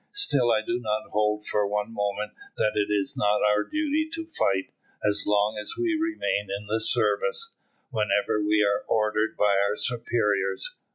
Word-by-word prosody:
"Still 140 - +3
I 110 -1 +2
do 120 +1 -1
not 110 -2 -3
hold 105 0 0
for 105 -1 +1
one 105 +2 -2
moment 105 0 -2 0.3
that 105 - +1
it 105 0 0
is 100 -2 0
not 105 0 +2
our 105 0 +3
duty 310 0 -1
to 330 0 -5
fight, 100 - -1 0.4
as 105 0 +2
long 105 +1 +2
as 105 - -5
we 350 -2 +1
remain 320 - -1
in 100 +1 -4
the 110 +2 -1
service, 460 - +1 0.4
whenever 105 -2 +1
we 105 0 +3
are 100 0 0
ordered 110 0 +1
by 100 -1 +3
our 100 +1 0
superiors. 105 -5 -1
105 Hz, 170 wpm, -26 LUFS, 105-120 Hz, 0.4 s, Still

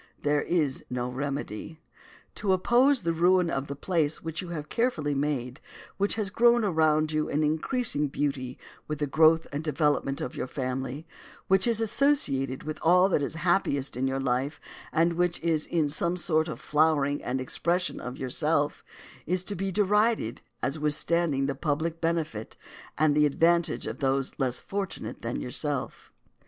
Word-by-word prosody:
There 145 0 +2
is 150 -6 0
no 125 0 -2
remedy. 140 +1 -4 0.5
To 200 -2 0
oppose 245 +7 +3
the 165 0 +1
ruin 175 +1 +3
of 135 +1 -2
the 140 - -5
place 160 0 -1
which 160 +1 -3
you 180 - -8
have 155 -3 -5
carefully 200 - 0
made, 135 -2 -2 0.4
which 200 +1 +1
has 210 -3 -2
grown 240 +1 +4
around 155 -4 +2
you 155 0 -1
in 150 +2 +1
increasing 155 - +1
beauty 135 -3 -3 0.3
with 150 - -3
the 145 - -1
growth 160 +3 +4
and 145 +2 -3
development 150 -2 0
of 125 - -5
your - - -3
family, 130 +3 -4 0.4
which 190 +3 +4
is 230 -2 +1
associated 200 - +1
with 155 0 -5
all 180 +3 +5
that 155 - +2
is 145 - -3
happiest 160 -6 0
in 130 +2 0
your 135 0 -1
life, 135 +3 -1 0.3
and 170 +2 +2
which 175 0 0
is 160 -2 0
in 160 -3 +1
some 170 +4 -1
sort 160 -2 +2
the 155 - -5
flowering 150 -2 +1
and 130 +1 -2
expression 175 +7 -1
of 125 +1 -6
yourself, 145 +3 0 0.4
is 180 +2 0
to 205 - -2
be 195 +1 -2
derided 210 - +1 0.2
as 140 +3 -1
withstanding 150 -1 +1
the 140 - -1
public 155 +3 -2
benefit 160 -10 -2 0.4
and 155 0 +3
the 150 0 +4
advantage 170 +3 +2
of - - -5
those 135 -1 0
less 130 -2 0
fortunate 195 -2 -5
than 115 +1 -3
yourself. 140 +1 -2
155 Hz, 165 wpm, -27 LUFS, 140-175 Hz, 0.5 s, all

